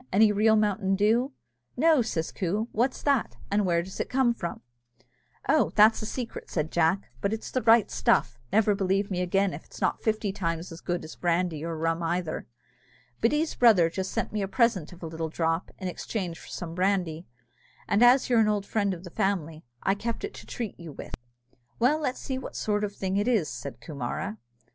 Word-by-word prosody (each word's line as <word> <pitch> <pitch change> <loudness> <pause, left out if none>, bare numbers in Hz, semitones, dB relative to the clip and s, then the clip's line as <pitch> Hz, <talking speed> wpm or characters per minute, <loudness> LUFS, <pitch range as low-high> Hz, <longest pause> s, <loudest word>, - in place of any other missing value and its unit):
any 210 +2 +5
real 215 +2 +4
mountain 205 -2 +1
dew?" 225 +7 +2 0.5
"No," 315 0 +5
says 170 -8 -2
Coo; 205 +5 -1
"what's 245 +4 0
that, 280 -4 +1
and 205 -1 +2
where 170 -1 +2
does 190 +2 -9
it - - -2
come 255 -2 +3
from?" 170 -7 -5 0.9
"Oh, 310 - +4
that's 215 +1 +6
a 215 - -3
secret," 245 0 -5
said 155 -1 -2
Jack, 170 +1 +1
"but 200 - 0
it's 220 0 -4
the 255 - 0
right 225 -1 +5
stuff 120 -1 +2
never 215 -1 +4
believe 195 0 0
me 180 -1 0
again, 195 +1 +1
if 145 - -9
'tis - - -11
not - - 0
fifty 215 -2 0
times 170 -3 -3
as 165 - -9
good 175 -1 -2
as 155 - -9
brandy 170 -3 0
or 165 -1 -3
rum 165 +1 0
either. 170 -1 -2 0.7
Biddy's 300 +7 +1
brother 195 -9 +5
just 190 +2 -3
sent - - -2
me 210 - -1
a 195 - -1
present 210 - +1
of 180 0 -13
a - - -3
little 160 0 -4
drop, 165 +1 -1
in 185 - -4
exchange 180 -1 -4
for - - -13
some 165 -2 -6
brandy, 180 -3 0 0.6
and 200 - +2
as 250 +2 +6
you're 240 -2 +4
an 220 - +4
old 205 -2 0
friend 200 -3 0
of 170 - -12
the 175 - -9
family, 170 -6 -1 0.2
I 195 - +3
kept 225 +3 -4
it 410 - -4
to - - -11
treat 230 -6 -5
you 165 -3 -9
with." - - -9 0.6
"Well, 270 +6 +3
let's 275 -4 -2
see 260 -1 -3
what - - -8
sort 210 -1 0
of 205 -1 -3
thing 190 0 -1
it 205 +3 +1
is," 220 -11 +2
said 120 -1 -7
Coomara. 150 - -4
195 Hz, 205 wpm, -27 LUFS, 170-220 Hz, 0.9 s, that's